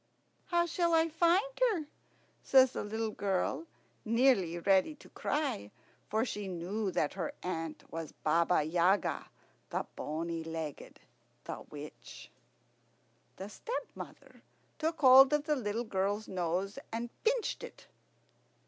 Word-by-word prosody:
"How 345 Hz, -2 st, +2 dB
shall 340 Hz, 0 st, +1 dB
I 325 Hz, 0 st, +3 dB
find 340 Hz, +5 st, +3 dB, 0.3 s
her?" 325 Hz, -6 st, -3 dB, 0.6 s
says 260 Hz, -1 st, +6 dB
the -, -, -4 dB
little 220 Hz, +1 st, -2 dB
girl, 200 Hz, -, -1 dB, 0.4 s
nearly 225 Hz, -7 st, +3 dB
ready 195 Hz, -, +3 dB
to -, -, -16 dB
cry, 285 Hz, -, -2 dB, 0.4 s
for 220 Hz, +3 st, +1 dB
she 210 Hz, -4 st, -4 dB
knew 190 Hz, +4 st, -2 dB
that 155 Hz, -5 st, 0 dB
her 175 Hz, -4 st, -3 dB
aunt 165 Hz, -3 st, -4 dB
was 165 Hz, -2 st, -5 dB
Baba 165 Hz, +1 st, +2 dB
Yaga, 175 Hz, +5 st, +1 dB, 0.4 s
the -, -, -2 dB
bony 165 Hz, +2 st, -3 dB
legged, 160 Hz, -3 st, -6 dB, 0.4 s
the -, -, -6 dB
witch. 150 Hz, 0 st, -10 dB, 1.0 s
The 190 Hz, -, -7 dB
stepmother 480 Hz, -, -7 dB, 0.4 s
took 320 Hz, +1 st, -1 dB
hold 265 Hz, +1 st, +9 dB
of 295 Hz, -1 st, +2 dB
the 300 Hz, 0 st, +1 dB
little 225 Hz, -2 st, -2 dB
girl's 205 Hz, 0 st, -1 dB
nose 185 Hz, +2 st, -2 dB
and 230 Hz, +1 st, -3 dB
pinched 470 Hz, -1 st, 0 dB
it. -, -, -10 dB
205 Hz, 125 wpm, -32 LUFS, -, 1.0 s, hold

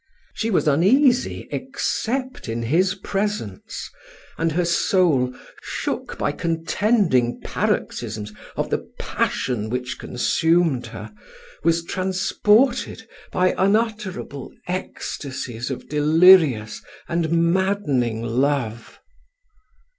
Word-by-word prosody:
She 225 Hz, -, -2 dB
was 185 Hz, -6 st, +1 dB
uneasy, 245 Hz, -, +3 dB
except 255 Hz, -, -3 dB
in 115 Hz, +1 st, -2 dB
his 180 Hz, -, +2 dB
presence; 195 Hz, -, -4 dB, 0.5 s
and 165 Hz, 0 st, 0 dB
her 175 Hz, +3 st, +1 dB
soul, 165 Hz, -7 st, +2 dB, 0.3 s
shook -, -, -4 dB
by -, -, 0 dB
contending 165 Hz, -, +1 dB
paroxysms 105 Hz, -1 st, -2 dB, 0.2 s
of -, -, -2 dB
the -, -, +1 dB, 0.2 s
passion 110 Hz, -4 st, -1 dB
which 125 Hz, 0 st, -3 dB
consumed 160 Hz, +1 st, +1 dB
her, 110 Hz, -2 st, -9 dB, 0.5 s
was 165 Hz, +1 st, +2 dB
transported 210 Hz, +6 st, +1 dB, 0.2 s
by 185 Hz, 0 st, +2 dB
unutterable 205 Hz, -, -1 dB, 0.2 s
ecstasies 130 Hz, -9 st, -4 dB
of 130 Hz, -, -6 dB
delirious 150 Hz, -, +5 dB, 0.3 s
and 170 Hz, -1 st, 0 dB, 0.2 s
maddening 145 Hz, -, 0 dB
love. 120 Hz, -1 st, -1 dB
165 Hz, 90 wpm, -22 LUFS, 125-195 Hz, 0.5 s, delirious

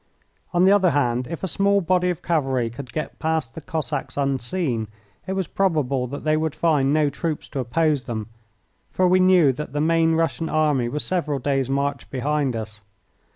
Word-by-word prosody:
On 175 Hz, 0 st, +3 dB
the 190 Hz, -, +6 dB
other 195 Hz, -3 st, +5 dB
hand, 125 Hz, -5 st, 0 dB
if 165 Hz, +1 st, -6 dB
a -, -, 0 dB
small 200 Hz, +3 st, +2 dB
body 180 Hz, 0 st, +1 dB
of 175 Hz, -, -3 dB
cavalry 135 Hz, -8 st, 0 dB
could 125 Hz, +2 st, -9 dB
get 155 Hz, -, -5 dB
past 160 Hz, -7 st, -1 dB
the 160 Hz, -, -8 dB
Cossacks 155 Hz, -1 st, -4 dB
unseen 135 Hz, -2 st, -1 dB, 0.4 s
it 190 Hz, -, -1 dB
was 190 Hz, -1 st, -1 dB
probable 150 Hz, -9 st, 0 dB
that 140 Hz, +3 st, -7 dB
they 155 Hz, 0 st, +2 dB
would 155 Hz, -1 st, -1 dB
find 150 Hz, -4 st, +2 dB
no 150 Hz, -1 st, +2 dB
troops 155 Hz, +2 st, -3 dB
to 140 Hz, -, -4 dB
oppose 145 Hz, +2 st, 0 dB
them, 110 Hz, -4 st, -4 dB, 0.6 s
for 185 Hz, -, +2 dB
we 185 Hz, +1 st, +4 dB
knew 180 Hz, -7 st, +5 dB
that 150 Hz, +1 st, -7 dB
the 145 Hz, -, -1 dB
main 165 Hz, +1 st, +3 dB
Russian 165 Hz, 0 st, 0 dB
army 150 Hz, -6 st, +1 dB
was 150 Hz, +4 st, -3 dB
several 155 Hz, -6 st, -1 dB
days' 135 Hz, -1 st, -1 dB
march 140 Hz, -1 st, -1 dB
behind 140 Hz, 0 st, -1 dB
us. 110 Hz, -1 st, -6 dB
150 Hz, 190 wpm, -23 LUFS, 135-165 Hz, 0.6 s, the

